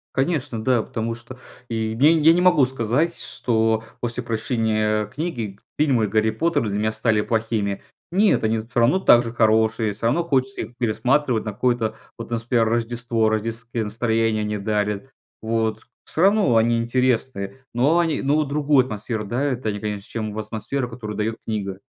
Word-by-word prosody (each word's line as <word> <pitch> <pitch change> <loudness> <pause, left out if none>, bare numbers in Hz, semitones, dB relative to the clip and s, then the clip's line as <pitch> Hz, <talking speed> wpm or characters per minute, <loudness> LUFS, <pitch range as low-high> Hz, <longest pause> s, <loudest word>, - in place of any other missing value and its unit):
Конечно, 135 -6 -1
да. 125 -1 +2
Потому 115 +1 -3
что, 125 +2 -12 0.3
и, 110 -1 -2
я 145 +5 +6
я 160 0 +5
не 175 - +2
могу 175 -6 +5
сказать, 130 +7 0
что 110 -2 0 0.2
после 120 +1 -2
прочтения 110 -2 0
книги, 115 - -5 0.2
фильмы 130 -8 +3
"Гарри 110 +1 +1
Поттер" 145 +1 0
для 100 +1 -2
меня 110 +1 0
стали 110 -1 +1
плохими. 110 -3 -1 0.3
Нет, 200 - +3
они 110 +1 +1
всё 115 +2 -2
равно 120 +11 +4
так 120 -9 +6
же 115 - -5
хорошие, 110 -2 +2
всё 110 +3 -3
равно 140 +9 +2
хочется 135 -5 0
их 115 +2 -10
пересматривать 125 +1 +1
на 105 - -2
какое-то, 115 -1 0 0.2
вот, 115 - -7
у - - -22
нас, 115 -1 -1
пример, 115 -1 +2
Рождество, 115 -1 0
рождественское 115 +1 -2
настроение 110 0 0
они 105 0 -2
дарят. 105 +2 -1 0.3
Вот, 110 -1 -1
с - - -18 0.3
всё 160 - 0
равно 195 - +4
они 115 +1 +3
интересные, 125 -1 -1
но 140 +8 +3
они, 165 -3 0
но 150 +3 +2
другую 145 -2 +2
атмосферу 110 -1 -4
дарят 130 +4 -2
они, 105 -2 -2
конечно, 105 -1 -4
чем 110 -2 -4
в - - -6
атмосферу, 120 +4 -3
которую 110 -3 -6
дает 110 +1 -1
книга. 100 -4 -3
115 Hz, 175 wpm, -22 LUFS, 110-130 Hz, 0.3 s, я